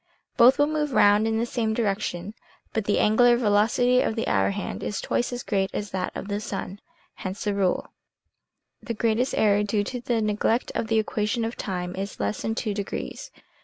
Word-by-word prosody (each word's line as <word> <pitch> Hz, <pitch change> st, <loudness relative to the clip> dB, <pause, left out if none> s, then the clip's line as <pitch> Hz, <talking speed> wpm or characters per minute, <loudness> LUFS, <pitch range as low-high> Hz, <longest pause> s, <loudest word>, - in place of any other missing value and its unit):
Both 245 Hz, +2 st, +6 dB
move 295 Hz, -1 st, +1 dB
round 210 Hz, 0 st, +5 dB
in 220 Hz, 0 st, 0 dB
the 230 Hz, -, +1 dB
same 225 Hz, -2 st, -1 dB
direction, 205 Hz, -3 st, -2 dB, 0.4 s
but 220 Hz, -2 st, -1 dB
the 205 Hz, -, +1 dB
angular 240 Hz, +3 st, +5 dB
velocity 235 Hz, +3 st, +3 dB
of 220 Hz, -, -1 dB
the 225 Hz, -, -2 dB
hour 95 Hz, 0 st, +2 dB
hand 95 Hz, -1 st, -4 dB
is 205 Hz, -, -3 dB
twice 240 Hz, -, -1 dB
as 245 Hz, 0 st, -4 dB
great 195 Hz, -2 st, 0 dB
as 205 Hz, -1 st, -4 dB
that 185 Hz, -1 st, -2 dB
of -, -, -5 dB
the 205 Hz, 0 st, -2 dB
sun. 200 Hz, -1 st, -6 dB, 0.4 s
Hence 190 Hz, +2 st, -5 dB
the 205 Hz, -, 0 dB
rule. 195 Hz, -2 st, 0 dB, 0.9 s
The 230 Hz, -, -4 dB
greatest 230 Hz, +4 st, +1 dB
error 205 Hz, -1 st, +4 dB
due 210 Hz, 0 st, 0 dB
to 245 Hz, +4 st, -5 dB
the 235 Hz, -1 st, 0 dB
neglect 215 Hz, +2 st, 0 dB
of 225 Hz, -, -2 dB
the 225 Hz, 0 st, +1 dB
equation 220 Hz, +1 st, 0 dB
of 230 Hz, -, -4 dB
time 180 Hz, -2 st, -4 dB
is 195 Hz, +1 st, -5 dB
less 100 Hz, 0 st, -2 dB
than 225 Hz, -, -2 dB
2 215 Hz, -3 st, -2 dB
degrees. 210 Hz, -, -5 dB
215 Hz, 195 wpm, -25 LUFS, 200-235 Hz, 0.9 s, Both